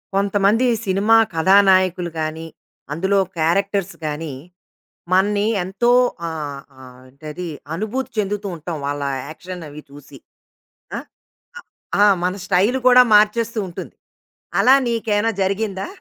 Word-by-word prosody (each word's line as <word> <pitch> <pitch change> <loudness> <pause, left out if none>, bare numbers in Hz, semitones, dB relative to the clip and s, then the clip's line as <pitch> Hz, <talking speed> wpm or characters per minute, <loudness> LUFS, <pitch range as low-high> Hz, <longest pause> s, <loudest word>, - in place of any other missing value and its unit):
కొంతమంది 200 +4 +2 0.2
సినిమా 200 +4 +3 0.2
కథానాయకులు 185 0 +3
గానీ, 160 +1 -4 0.5
అందులో 190 +5 +1 0.2
క్యారెక్టర్స్ 195 +4 0
గానీ, 150 0 -4 0.8
మన్ని 205 +2 +2 0.2
ఎంతో 195 +7 0 0.4
ఆహ్, 145 -3 -6 0.2
ఆహ్, 125 -1 -14
ఏంటది? 155 +6 -8 0.3
అనుభూతి 220 +8 -4
చెందుతూ 205 0 -2
ఉంటాం 160 +1 -6
వాళ్ళ 145 0 -3 0.3
యాక్షన్ 180 +2 -9
అవి 150 +1 -10
చూసి. 145 0 -14 0.8
ఆ! - - -3 0.6
ఆ! - - -8 0.4
ఆ! - - +7 0.2
మన 180 - 0
స్టైలు 205 +7 +2
కూడా 250 0 +8
మార్చేస్తూ 220 +2 +2
ఉంటుంది. 175 - -9 0.7
అలా 260 +2 +6
నీకేయన్నా 225 -1 0
జరిగిందా? 195 0 -2
190 Hz, 110 wpm, -20 LUFS, 160-210 Hz, 0.8 s, కూడా